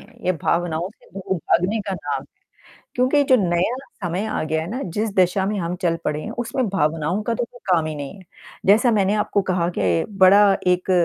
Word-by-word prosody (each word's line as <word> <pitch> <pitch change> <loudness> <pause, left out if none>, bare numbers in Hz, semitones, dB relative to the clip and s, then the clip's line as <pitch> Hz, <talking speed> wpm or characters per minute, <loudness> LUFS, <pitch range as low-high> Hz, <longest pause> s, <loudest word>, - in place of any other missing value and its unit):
है, - - -18
ये 185 - +2
भावनाओं 170 0 0
से - - -24
दूर 190 0 -4
भागने 185 +6 +1
का 195 - -2
नाम - - -3
है। - - -18 0.7
क्योंकि 255 +4 +3
जो 260 -2 +5
नया 180 +3 +1 0.3
समय 175 +4 -2
आ 215 - -2
गया 160 0 -1
है 165 - -6
ना, 250 +5 -4
जिस 210 +5 -2
दिशा 185 +1 +2
में 205 0 -1
हम 175 0 -3
चल 170 -2 +1
पड़े 150 0 -1
हैं, 220 - -6
उसमें 240 +2 -2
भावनाओं 165 +1 0
का 230 +2 -1
तो 240 - -1
कोई 245 +1 -16
काम 165 -3 +2
ही 155 - -4
नहीं 145 +2 -6
है। 190 - -14 0.4
जैसा 215 +5 +5
मैंने 205 -2 +2
आपको 210 -1 0
कहा 180 -3 0
के 90 -4 +1 0.2
बड़ा 200 +3 +7 0.2
एक 180 +1 +1
185 Hz, 215 wpm, -22 LUFS, 170-215 Hz, 0.7 s, बड़ा